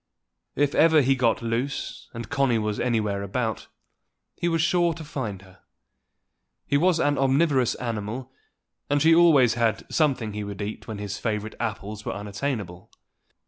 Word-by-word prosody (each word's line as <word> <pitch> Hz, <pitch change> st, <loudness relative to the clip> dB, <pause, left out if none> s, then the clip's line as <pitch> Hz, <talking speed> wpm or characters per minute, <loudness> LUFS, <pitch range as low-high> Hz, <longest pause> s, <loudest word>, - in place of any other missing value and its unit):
If 145 Hz, +1 st, +1 dB
ever 160 Hz, -1 st, +5 dB
he 135 Hz, +2 st, +4 dB
got 120 Hz, -2 st, +1 dB
loose, 120 Hz, +4 st, -3 dB
and 115 Hz, 0 st, -7 dB
Connie 135 Hz, -5 st, +1 dB
was 105 Hz, -1 st, -2 dB
anywhere 105 Hz, -5 st, 0 dB
about, 110 Hz, +2 st, -3 dB, 0.7 s
he 175 Hz, -, -2 dB
was 165 Hz, -1 st, +1 dB
sure 175 Hz, 0 st, +2 dB
to 160 Hz, -, -8 dB
find 110 Hz, -10 st, -5 dB
her: 95 Hz, -1 st, -18 dB, 1.1 s
he -, -, 0 dB
was 170 Hz, +3 st, +3 dB
an 145 Hz, -1 st, +1 dB
omnivorous 135 Hz, -2 st, +2 dB
animal, 115 Hz, +2 st, -4 dB, 0.6 s
and 145 Hz, 0 st, +2 dB
she 160 Hz, +3 st, +5 dB
had 165 Hz, -, +6 dB
always 145 Hz, -9 st, +5 dB, 0.4 s
something 130 Hz, -9 st, +1 dB
he 105 Hz, 0 st, -4 dB
would 100 Hz, -1 st, -7 dB
eat 105 Hz, +1 st, -6 dB
when 110 Hz, -2 st, -5 dB
his 100 Hz, 0 st, -5 dB
favorite 110 Hz, -1 st, -3 dB
apples 105 Hz, -2 st, -4 dB
were -, -, -3 dB
unattainable. 105 Hz, -3 st, -4 dB
120 Hz, 155 wpm, -25 LUFS, 105-145 Hz, 1.1 s, had